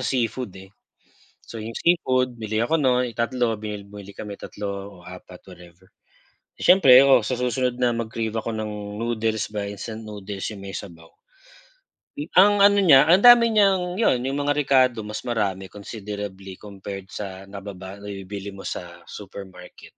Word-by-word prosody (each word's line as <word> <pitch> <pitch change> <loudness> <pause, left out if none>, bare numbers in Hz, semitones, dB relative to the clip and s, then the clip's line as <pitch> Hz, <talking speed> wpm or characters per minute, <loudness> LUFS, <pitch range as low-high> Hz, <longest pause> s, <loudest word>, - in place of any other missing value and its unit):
seafood, 125 -5 -2
eh, 95 +1 -13 0.7
so, 115 - -10
yung 110 +1 -6
seafood, 130 -8 +1
bili 110 0 -2
ako 160 +8 +1
nun 125 -4 +2
tatlo, 115 -1 0
bili 105 -1 -6
bumili 100 0 -12
kami 100 0 -8
3 105 - -11
o 100 -2 -6
4, 90 +1 -11 0.2
whatever. 90 +1 -16 0.7
Siyempre, 135 -9 +7
oo, 135 - +5
sa 125 -2 -2
susunod 125 0 -1
na 120 -2 +2
mag-crave 115 -1 -3
ako 115 +1 -2
ng 105 -1 -5
noodles, 110 -2 -1
ba 105 - -2
instant 105 +2 -7
noodles 105 -1 -6
yung 105 - -9
may 95 - -7
sabaw, 80 -4 -9 1.1
hmm, 150 +3 -7
ang 205 +1 +6
ano 200 0 +6
niya, 160 -7 +6
ang 190 +6 +5
dami 240 -1 +8
niyang 190 -4 +2
'yon, 130 - +2
yung 135 +2 -2
mga 145 0 +1
rekado, 130 -5 +2
mas 105 0 -7
marami, 100 -5 -1
considerably, 100 -1 -8
compared 100 0 -9
sa 95 -1 -8
nababa 100 -1 -9
nabibili 100 0 -7
mo 95 - -10
sa 85 -1 -7
supermarket. 95 -3 -11
110 Hz, 155 wpm, -23 LUFS, 100-125 Hz, 1.1 s, dami